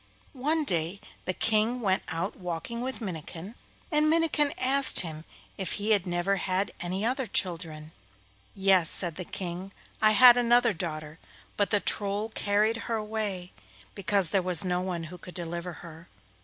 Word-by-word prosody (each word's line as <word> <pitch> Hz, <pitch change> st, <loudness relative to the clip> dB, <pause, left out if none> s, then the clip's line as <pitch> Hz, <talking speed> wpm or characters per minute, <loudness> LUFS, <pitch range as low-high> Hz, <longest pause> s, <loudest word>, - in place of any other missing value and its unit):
One 300 Hz, +4 st, 0 dB
day 175 Hz, -, -1 dB, 0.3 s
the 185 Hz, -, -1 dB
King 225 Hz, +3 st, +1 dB
went 195 Hz, -4 st, +1 dB
out 165 Hz, +4 st, -3 dB
walking 180 Hz, +6 st, -5 dB
with 260 Hz, 0 st, -4 dB
Minnikin, 175 Hz, 0 st, -7 dB, 0.4 s
and 305 Hz, 0 st, +3 dB
Minnikin 315 Hz, -3 st, +2 dB
asked 270 Hz, +1 st, +4 dB
him 160 Hz, -3 st, -7 dB, 0.3 s
if 190 Hz, -3 st, -2 dB
he 210 Hz, +1 st, -1 dB
had 200 Hz, -3 st, +2 dB
never 175 Hz, +3 st, 0 dB
had 190 Hz, +2 st, -1 dB
any 185 Hz, +4 st, -3 dB
other 255 Hz, +1 st, -1 dB
children. 165 Hz, -5 st, -3 dB, 0.6 s
'Yes,' 190 Hz, -4 st, +4 dB
said 175 Hz, -4 st, +6 dB
the 180 Hz, -, -5 dB
King, 180 Hz, +2 st, -6 dB, 0.3 s
'I 215 Hz, 0 st, +5 dB
had 245 Hz, +2 st, +8 dB
another 240 Hz, -1 st, +3 dB
daughter, 155 Hz, -2 st, -6 dB, 0.4 s
but 205 Hz, -2 st, 0 dB
the 205 Hz, -, +2 dB
Troll 205 Hz, +2 st, -2 dB
carried 215 Hz, +1 st, +1 dB
her 230 Hz, -, 0 dB
away 210 Hz, -4 st, -4 dB, 0.4 s
because 195 Hz, -3 st, +1 dB
there 195 Hz, -, +2 dB
was 180 Hz, +1 st, +4 dB
no 180 Hz, 0 st, 0 dB
one 180 Hz, -2 st, -4 dB
who 175 Hz, +2 st, -9 dB
could 180 Hz, -, -12 dB
deliver 170 Hz, 0 st, -5 dB
her. 165 Hz, +1 st, -12 dB
195 Hz, 160 wpm, -28 LUFS, 175-220 Hz, 0.6 s, had